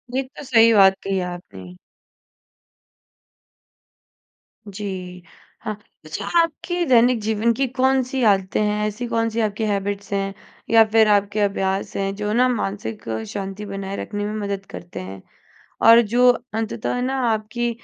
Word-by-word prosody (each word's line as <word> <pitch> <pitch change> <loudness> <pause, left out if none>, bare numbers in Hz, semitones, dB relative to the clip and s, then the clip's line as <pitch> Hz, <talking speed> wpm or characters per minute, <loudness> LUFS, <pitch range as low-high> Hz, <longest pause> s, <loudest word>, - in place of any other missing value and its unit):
ये 265 - +2
तो 260 +2 -12
सही 230 -3 +5
बात 195 -2 +6
कही 195 -1 -1
आपने। 100 - -8 2.9
जी। 185 -3 -7 0.4
हाँ, 215 - -3 0.3
अच्छा 155 - -5
आपके 335 +2 -1
दैनिक 245 -2 +4
जीवन 220 +2 +1
की 270 +3 0
कौन-सी 260 +1 0
आदतें 195 -2 +2
हैं, 210 0 0
ऐसी 215 +4 -5
कौन-सी 230 -1 -1
आपकी 215 0 -1
हैबिट्स 200 -1 -2
हैं 195 0 -1 0.4
या 225 0 +7
फिर 220 -1 +5
आपके 205 0 +2
अभ्यास 195 -1 -1
हैं, 195 0 -1
जो 210 +1 -3
ना 250 +2 +4
मानसिक 210 -2 -3 0.3
शांति 195 +1 -5
बनाए 195 -1 -5
रखने 205 -1 -4
में 210 - -3
मदद 200 -1 -4
करते 175 +1 -8
हैं? 95 +1 -8 0.6
और 230 +1 +8
जो 240 +3 +3 0.3
अंततः 225 +2 -2
ना 265 +1 -1
आपकी 220 +2 -1
210 Hz, 140 wpm, -22 LUFS, 195-235 Hz, 2.9 s, और